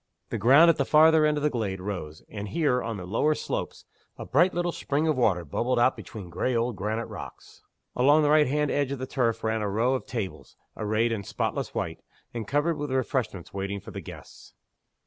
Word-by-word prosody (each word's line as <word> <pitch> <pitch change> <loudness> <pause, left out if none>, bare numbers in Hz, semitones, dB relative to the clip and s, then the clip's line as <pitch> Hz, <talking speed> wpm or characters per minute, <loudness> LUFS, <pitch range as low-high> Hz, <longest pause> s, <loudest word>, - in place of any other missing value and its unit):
The 115 - -2
ground 140 +10 +7
at 160 - -4
the 140 - +2
farther 155 +2 +5
end 150 0 +1
of 145 - -3
the 150 - +2
glade 105 -6 -2
rose; 90 -6 -6
and 105 -1 -6
here, 125 - +1
on 115 -2 -4
the 90 - -7
lower 115 +11 +1
slopes, - - -4 0.3
a - - -7
bright 175 +7 +3
little 175 0 -1
spring 150 0 -1
of 155 - +2
water 95 -9 +1
bubbled 120 - -1
out 120 +2 +4
between 100 -6 -9
gray 120 +9 -1
old 115 0 0
granite 110 +4 -2
rocks. - - -10 0.3
Along 145 +5 +5
the 145 - +3
right 150 -2 +5
hand 150 +2 0
edge 140 -2 0
of 140 - -2
the 130 - -4
turf 115 -4 -1
ran 110 0 0
a 105 - -1
row 115 +6 +1
of 130 - -3
tables, 110 -6 -5 0.2
arrayed 110 +2 0
in 110 -3 -2
spotless - - -3
white, - - -3 0.3
and 115 -3 -5
covered 145 +4 +1
with 145 -1 -4
refreshments 125 -8 -2
waiting 100 +1 -3
for - - -11
the - - -6
guests. - - -12
125 Hz, 215 wpm, -27 LUFS, 105-145 Hz, 0.3 s, ground